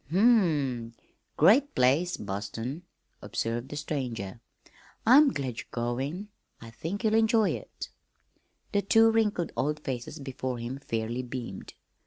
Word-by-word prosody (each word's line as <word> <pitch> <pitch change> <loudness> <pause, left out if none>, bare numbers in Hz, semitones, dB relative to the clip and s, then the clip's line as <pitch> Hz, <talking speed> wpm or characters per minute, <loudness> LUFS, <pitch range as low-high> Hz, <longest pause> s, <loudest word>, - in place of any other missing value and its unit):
"Hm 170 - 0 0.2
m! 135 - -1 0.4
great 230 - +5
place, 140 +8 +3
Boston," 105 - -5 0.4
observed 115 +3 -3
the 145 - -6
stranger. 120 -8 -4 0.6
"I'm 275 +6 +8
glad 130 - -4
you're - - -8
going. 135 - -3 0.3
I 115 0 -11
think 175 - -5
you'll 220 -1 +2
enjoy 220 -1 +4
it." - - -7 0.8
The 205 - +2
two 225 +3 +5
wrinkled 210 -6 +1
old 150 +2 0
faces 130 +1 -5
before 130 -3 -4
him 120 +3 -5
fairly 115 -2 -3
beamed. 120 -6 -7
135 Hz, 130 wpm, -28 LUFS, 120-195 Hz, 0.8 s, I'm